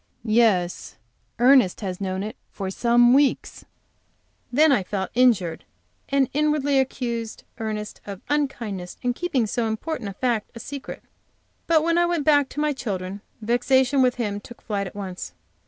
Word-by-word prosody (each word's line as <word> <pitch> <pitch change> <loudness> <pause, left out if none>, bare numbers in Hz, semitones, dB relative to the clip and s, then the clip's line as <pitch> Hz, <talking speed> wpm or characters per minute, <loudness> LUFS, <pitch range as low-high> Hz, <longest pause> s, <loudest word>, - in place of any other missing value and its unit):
"Yes, 215 -6 +2 0.4
Ernest 245 -6 +5
has 185 -2 -4
known 190 0 -2
it 215 - -6
for 195 -2 -5
some 240 +3 +4
weeks." 280 0 +1 0.9
Then 300 +4 +5
I 255 - +3
felt 190 +1 -4
injured 225 -9 +2 0.5
and 275 -1 +3
inwardly 295 -2 +2
accused 235 -4 -3 0.2
Ernest 215 -1 -4
of 200 -2 -7
unkindness 230 -11 -2
in 245 0 +1
keeping 270 -5 0
so 225 +2 -1
important 220 +1 -3
a - - -7
fact 235 0 -1
a - - -7
secret. 280 +3 -8 0.6
But 320 -2 +4
when 335 +1 +2
I 345 - +3
went 340 -4 -1
back 290 -3 +4
to - - -6
my 300 0 +1
children, 200 -6 -4 0.2
vexation 260 +4 +2
with 250 -1 +3
him 210 -4 -2
took 240 +3 -14
flight 200 -3 -2
at 190 - -11
once. 185 - -6
240 Hz, 155 wpm, -24 LUFS, 200-275 Hz, 0.9 s, Ernest